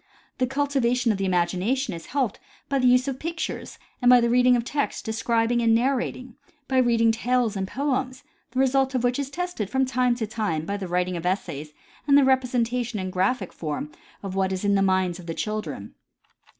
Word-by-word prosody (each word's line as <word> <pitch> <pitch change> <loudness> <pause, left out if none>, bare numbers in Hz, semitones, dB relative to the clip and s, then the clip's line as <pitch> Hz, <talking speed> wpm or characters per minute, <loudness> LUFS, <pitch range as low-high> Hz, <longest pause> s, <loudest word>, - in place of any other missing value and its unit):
The 255 - +2
cultivation 255 -3 +1
of 200 - -2
the 195 - 0
imagination 185 +9 0
is 165 -1 -8
helped 255 -5 -1 0.3
by 275 -1 +1
the 255 - +3
use 250 +1 +4
of 265 -1 -3
pictures 330 0 -5 0.2
and 245 - +4
by 250 0 +8
the 235 0 +1
reading 250 0 +5
of 235 - 0
text, 285 +2 -2
describing 230 +1 +1
and 225 -1 +4
narrating; 255 0 -1 0.3
by 260 -1 +2
reading 230 -2 +4
tales 235 -1 0
and 190 -1 -2
poems, 260 0 -2 0.3
the 255 - -3
result 270 0 +2
of 250 - 0
which 245 +2 +1
is 280 -1 -3
tested 355 - -4
from 265 +2 +1
time 255 -1 +1
to 235 -2 -2
time 210 -8 -2
by 200 - -2
the 195 -2 -5
writing 180 0 -1
of 170 - -6
essays 150 -5 -3 0.3
and 280 0 +6
the 285 - +6
representation 250 -3 +1
in 185 -1 -3
graphic 190 +2 0
form 150 -1 -4 0.3
of 195 -2 -5
what 190 0 0
is 190 +1 -3
in 200 - +3
the 195 - +3
minds 185 -2 +1
of 175 - -11
the 165 - -4
children. 170 - -4
235 Hz, 200 wpm, -25 LUFS, 190-255 Hz, 0.3 s, by